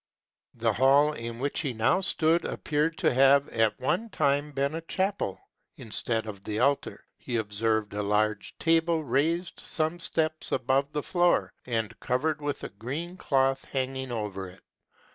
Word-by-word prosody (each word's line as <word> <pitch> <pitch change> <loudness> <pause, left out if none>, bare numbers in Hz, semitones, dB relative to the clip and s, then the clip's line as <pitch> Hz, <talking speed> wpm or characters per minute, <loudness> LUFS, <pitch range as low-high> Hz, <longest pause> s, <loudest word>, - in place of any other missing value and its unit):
The 115 -1 +1
hall 140 +5 +4
in 115 -3 -6
which 140 +3 -2
he 140 -5 -2
now 115 +12 +2
stood 165 -2 +2
appeared 155 +2 -1
to - - +2
have 135 +2 +5
at 110 -2 +1
one 220 - 0
time 145 -4 +1
been 140 +1 -1
a 165 - -3
chapel: 190 - -2 0.4
instead 110 0 -2
of 100 -3 -8
the 105 - -3
altar, 140 +4 0
he 125 - -4
observed 110 0 0
a 105 - -2
large 105 0 0
table 165 0 +2
raised 160 +7 0
some 160 +2 +1
steps 155 -1 -1
above 135 +3 +1
the 150 -1 -2
floor, 175 -1 +2
and 115 -2 -2
covered 150 +5 -1
with 145 -1 -3
a - - -4
green 140 - -5
cloth 135 -5 +1
hanging 130 -1 -3
over 105 -4 -4
it. 90 - -17
135 Hz, 160 wpm, -28 LUFS, 115-155 Hz, 0.4 s, have